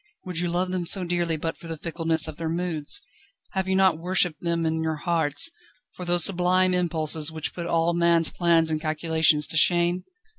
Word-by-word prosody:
Would 180 Hz, -3 st, -3 dB
you 175 Hz, 0 st, -1 dB
love 180 Hz, +2 st, -1 dB
them 180 Hz, -2 st, -2 dB
so 190 Hz, -, +3 dB
dearly 175 Hz, -2 st, -1 dB
but 165 Hz, +2 st, -4 dB
for 170 Hz, -, -11 dB
the 165 Hz, -1 st, -5 dB
fickleness 165 Hz, 0 st, -1 dB
of 155 Hz, -1 st, -8 dB
their 165 Hz, -1 st, -4 dB
moods? 170 Hz, -, -1 dB, 0.5 s
Have 190 Hz, -1 st, -3 dB
you 190 Hz, -, 0 dB
not 190 Hz, -4 st, +3 dB
worshipped 180 Hz, -2 st, 0 dB
them 170 Hz, -1 st, -1 dB
in 160 Hz, 0 st, -1 dB
your 160 Hz, -1 st, -2 dB
hearts, 160 Hz, -, +1 dB, 0.4 s
for 180 Hz, -, -8 dB
those 175 Hz, -1 st, +3 dB
sublime 185 Hz, 0 st, +2 dB
impulses 160 Hz, -3 st, +1 dB
which 160 Hz, -1 st, -4 dB
put 170 Hz, -1 st, -6 dB
all 170 Hz, 0 st, +1 dB
man's 170 Hz, -1 st, +3 dB
plans 165 Hz, -2 st, +2 dB
and 155 Hz, -1 st, -2 dB
calculations 155 Hz, -1 st, +1 dB
to 160 Hz, -, -2 dB
shame? 175 Hz, +2 st, +2 dB
170 Hz, 195 wpm, -24 LUFS, 160-180 Hz, 0.5 s, so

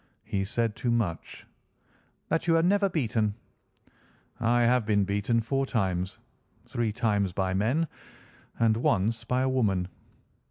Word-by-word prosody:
"He 95 Hz, -1 st, -2 dB
said 115 Hz, +1 st, -1 dB
too 120 Hz, +2 st, -2 dB
much." 110 Hz, -8 st, -2 dB, 0.8 s
"That 165 Hz, +2 st, 0 dB
you 165 Hz, -1 st, +4 dB
are 165 Hz, -, +3 dB
never 200 Hz, +2 st, +3 dB
beaten." 110 Hz, -, 0 dB, 1.0 s
"I 120 Hz, +1 st, +2 dB
have 125 Hz, 0 st, +3 dB
been 105 Hz, -2 st, +2 dB
beaten 100 Hz, +4 st, 0 dB
four 135 Hz, +4 st, -1 dB
times—three 95 Hz, +2 st, -3 dB
times 105 Hz, -5 st, 0 dB
by 95 Hz, 0 st, -1 dB
men, 120 Hz, -, +1 dB, 0.7 s
and 110 Hz, -1 st, +3 dB
once 115 Hz, 0 st, +1 dB
by 125 Hz, +1 st, +1 dB
a 130 Hz, -, +1 dB
woman." 100 Hz, -9 st, +1 dB
115 Hz, 130 wpm, -28 LUFS, 100-125 Hz, 1.0 s, you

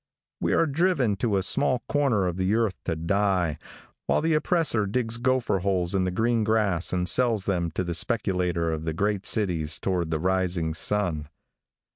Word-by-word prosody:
We -, -, 0 dB
are -, -, +3 dB
driven 145 Hz, -, +1 dB
to 105 Hz, -1 st, 0 dB
a 95 Hz, -, 0 dB
small 130 Hz, +3 st, +1 dB
corner 135 Hz, -10 st, +1 dB
of 90 Hz, -1 st, -2 dB
the 95 Hz, +3 st, +1 dB
earth 115 Hz, -4 st, +1 dB
to 80 Hz, -, -1 dB
die, 90 Hz, -2 st, 0 dB, 0.5 s
while -, -, +2 dB
the 165 Hz, +1 st, +1 dB
oppressor 155 Hz, -, +1 dB
digs 115 Hz, +2 st, -1 dB
gopher 125 Hz, -5 st, +1 dB
holes 90 Hz, -1 st, -1 dB
in 95 Hz, -1 st, +1 dB
the -, -, 0 dB
green 115 Hz, +4 st, +1 dB
grass 105 Hz, -5 st, +1 dB
and 90 Hz, -1 st, -1 dB
sells 115 Hz, -5 st, +2 dB
them 85 Hz, -4 st, 0 dB
to -, -, 0 dB
the 85 Hz, -1 st, -3 dB
speculator 90 Hz, -5 st, 0 dB
of 80 Hz, 0 st, -4 dB
the 80 Hz, -, -2 dB
great 100 Hz, +3 st, -1 dB
cities 85 Hz, -7 st, 0 dB
toward 90 Hz, -4 st, -2 dB
the 80 Hz, -, 0 dB
rising 90 Hz, -2 st, 0 dB
sun. 80 Hz, -4 st, -1 dB
95 Hz, 180 wpm, -25 LUFS, 90-115 Hz, 0.5 s, are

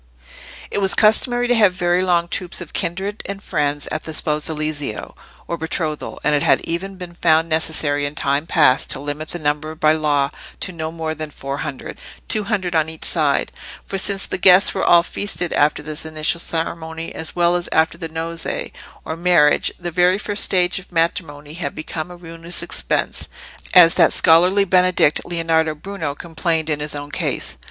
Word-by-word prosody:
It -, -, -1 dB
was 195 Hz, 0 st, +3 dB
customary 245 Hz, +3 st, +3 dB
to 245 Hz, -, +4 dB
have 210 Hz, -6 st, +4 dB
very 175 Hz, 0 st, +1 dB
long 175 Hz, -2 st, +1 dB
troops 180 Hz, 0 st, -2 dB
of 175 Hz, -4 st, -9 dB
kindred 195 Hz, +3 st, -3 dB
and 200 Hz, +1 st, -6 dB
friends 145 Hz, -3 st, -1 dB
at 155 Hz, -, -2 dB
the 160 Hz, -, -7 dB
sposalizio, 150 Hz, -5 st, -2 dB, 0.3 s
or 170 Hz, -, -3 dB
betrothal, 160 Hz, -1 st, -3 dB
and 150 Hz, -, +2 dB
it 145 Hz, -, +2 dB
had -, -, +4 dB
even 190 Hz, +4 st, -3 dB
been 180 Hz, -2 st, -9 dB
found 165 Hz, -1 st, +2 dB
necessary 155 Hz, -3 st, 0 dB
in 145 Hz, -, -8 dB
time 140 Hz, +3 st, -1 dB
past 145 Hz, -6 st, +3 dB
to -, -, -2 dB
limit 145 Hz, +3 st, -5 dB
the -, -, -4 dB
number 155 Hz, 0 st, -1 dB
by 155 Hz, 0 st, +3 dB
law 145 Hz, -3 st, +1 dB, 0.3 s
to 185 Hz, -, -1 dB
no 160 Hz, -2 st, -5 dB
more 160 Hz, -1 st, -4 dB
than 155 Hz, -1 st, -6 dB
four 140 Hz, -1 st, -6 dB
hundred—two 155 Hz, +8 st, -4 dB
hundred 190 Hz, -5 st, -1 dB
on 160 Hz, -1 st, +1 dB
each 160 Hz, 0 st, -5 dB
side; 150 Hz, -4 st, +1 dB, 0.3 s
for 195 Hz, -, -3 dB
since 195 Hz, 0 st, +1 dB
the -, -, -4 dB
guests 185 Hz, +2 st, +6 dB
were 190 Hz, -, -2 dB
all 170 Hz, -1 st, +6 dB
feasted 180 Hz, -1 st, -3 dB
after 150 Hz, 0 st, +2 dB
this 150 Hz, 0 st, -5 dB
initial 160 Hz, +1 st, -1 dB
ceremony, 160 Hz, -1 st, -4 dB
as 160 Hz, -, -2 dB
well 175 Hz, 0 st, +3 dB
as 175 Hz, -1 st, -2 dB
after 160 Hz, +1 st, +2 dB
the 165 Hz, -1 st, -7 dB
nozze, 165 Hz, +1 st, -4 dB, 0.3 s
or 160 Hz, -, -4 dB
marriage, 165 Hz, -3 st, +3 dB
the 175 Hz, -1 st, -4 dB
very 180 Hz, +2 st, +3 dB
first 205 Hz, 0 st, -1 dB
stage 180 Hz, 0 st, +1 dB
of 185 Hz, -, -16 dB
matrimony 160 Hz, -3 st, -2 dB
had 160 Hz, -4 st, -5 dB
become 155 Hz, +1 st, -5 dB
a 180 Hz, -, -10 dB
ruinous 165 Hz, 0 st, -6 dB
expense, -, -, -2 dB, 0.5 s
as 170 Hz, -2 st, +9 dB
that -, -, +5 dB
scholarly 180 Hz, +5 st, +4 dB
Benedict, 180 Hz, -4 st, +3 dB
Leonardo 165 Hz, -2 st, 0 dB
Bruno, 160 Hz, -3 st, -5 dB
complained 160 Hz, 0 st, -2 dB
in 150 Hz, -, -1 dB
his 150 Hz, 0 st, -4 dB
own 145 Hz, 0 st, -7 dB
case. -, -, -1 dB
165 Hz, 180 wpm, -20 LUFS, 155-180 Hz, 0.5 s, as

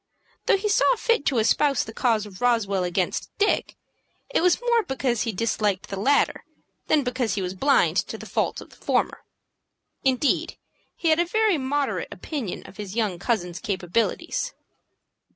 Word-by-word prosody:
Though -, -, +5 dB
he 410 Hz, +2 st, -2 dB
saw 420 Hz, +4 st, +4 dB
fit 465 Hz, -8 st, +1 dB
to 260 Hz, -, +2 dB
espouse 275 Hz, +5 st, +3 dB
the 220 Hz, -, -9 dB
cause 225 Hz, -4 st, +1 dB
of 195 Hz, -1 st, -12 dB
Roswell 220 Hz, -6 st, +2 dB
against 175 Hz, 0 st, -1 dB
Dick, 415 Hz, -, +1 dB, 0.6 s
it -, -, +2 dB
was 360 Hz, 0 st, +4 dB
more 475 Hz, -1 st, +2 dB
because 260 Hz, -, -1 dB
he 230 Hz, -, 0 dB
disliked 210 Hz, -2 st, -1 dB
the 195 Hz, -, -4 dB
latter 280 Hz, +7 st, +2 dB, 0.4 s
than 295 Hz, -, +3 dB
because 250 Hz, -3 st, -1 dB
he 200 Hz, -, -1 dB
was 180 Hz, 0 st, -3 dB
blind 275 Hz, +9 st, +3 dB
to -, -, -6 dB
the -, -, -10 dB
faults -, -, -1 dB
of -, -, -13 dB
the -, -, -17 dB
former. -, -, 0 dB, 0.8 s
Indeed, 265 Hz, +1 st, +1 dB, 0.4 s
he 335 Hz, -, 0 dB
had 315 Hz, +1 st, +4 dB
a 345 Hz, -, +3 dB
very 425 Hz, -2 st, +2 dB
moderate 275 Hz, +1 st, -1 dB
opinion 270 Hz, -, -5 dB
of -, -, -13 dB
his 205 Hz, -1 st, -6 dB
young 210 Hz, -7 st, 0 dB
cousin's 180 Hz, -5 st, -1 dB
capabilities. 220 Hz, -, -1 dB
245 Hz, 170 wpm, -25 LUFS, 205-300 Hz, 0.8 s, Though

